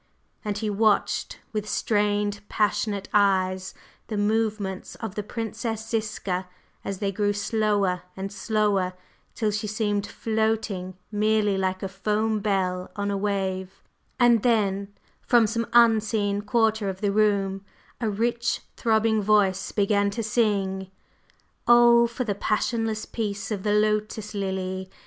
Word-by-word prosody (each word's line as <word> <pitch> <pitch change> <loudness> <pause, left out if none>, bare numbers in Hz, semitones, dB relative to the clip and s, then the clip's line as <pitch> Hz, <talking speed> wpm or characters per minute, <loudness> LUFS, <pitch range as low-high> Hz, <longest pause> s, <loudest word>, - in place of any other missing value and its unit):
And 210 -1 -2
he 215 - -2
watched 210 0 +1 0.2
with 210 -1 -3
strained, 205 -1 0
passionate 210 -1 0
eyes 185 -2 +2 0.3
the 215 - -3
movements 210 -2 -1
of 220 -4 -6
the 210 - -3
Princess 225 +1 -4
Ziska 205 -5 -2 0.4
as 195 - -4
they 200 0 -1
grew 205 +1 0
slower 205 -3 0 0.2
and 195 +1 -4
slower, 205 -4 +1 0.4
till 215 -2 0
she 210 +1 -2
seemed 205 -1 -1
floating 220 -5 -1
merely 210 -1 +2
like 190 0 -1
a - - -1
foam 210 +3 0
bell 185 -3 -1
on 205 -1 -2
a - - -1
wave, 195 -2 -2 0.4
and 240 -3 +5
then… 200 -4 +1 0.3
from 240 -2 +4
some 230 +1 -1
unseen 215 -3 +3
quarter 220 -1 +1
of 190 0 -6
the 205 -1 +1
room 200 -2 +1 0.4
a 225 - 0
rich 235 +3 0
throbbing 220 -1 +2
voice 195 -2 +2
began 200 0 +2
to 225 +3 -3
sing: 200 -4 0 0.8
"Oh, 240 0 +7
for 235 +2 -3
the 215 -4 -1
passionless 215 +2 -1
peace 205 -2 -4
of 205 -3 -2
the 205 +1 +1
Lotus 215 0 0
Lily! 190 -1 -3
210 Hz, 135 wpm, -25 LUFS, 195-220 Hz, 0.8 s, Oh